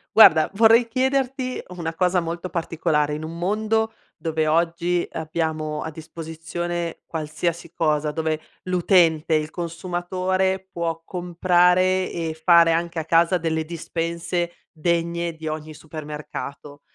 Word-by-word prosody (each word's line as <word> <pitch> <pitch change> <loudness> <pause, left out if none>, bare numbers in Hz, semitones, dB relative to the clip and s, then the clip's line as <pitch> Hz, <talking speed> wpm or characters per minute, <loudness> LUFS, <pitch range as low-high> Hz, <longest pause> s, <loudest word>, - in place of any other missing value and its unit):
Guarda 160 -8 +8
vorrei 225 +2 +6
chiederti 260 +1 0
una 165 -2 -3
cosa 180 +1 +2
molto 170 +2 -4
particolare, 160 -3 0
in 155 +1 -4
un 165 +1 -6
mondo 220 +4 0 0.2
dove 160 -1 -1
oggi 170 +2 +1
abbiamo 155 -1 -2
a 160 - -5
disposizione 165 +2 -5
qualsiasi 160 +1 -3
cosa, 155 -2 +1
dove 160 0 -1 0.2
l'utente, 170 -3 +3
il 155 0 -1
consumatore 185 +2 -1
può 165 -2 -3
comprare 180 +1 +2
e 165 -2 -3
fare 170 -1 +7
anche 170 +1 -1
a 160 - -2
casa 170 +2 +4
delle 160 -1 -1
dispense 170 +1 -3 0.2
degne 170 +1 -1
di 160 0 -7
ogni 155 0 -5
supermercato. 150 -2 -7
170 Hz, 120 wpm, -23 LUFS, 160-180 Hz, 0.2 s, Guarda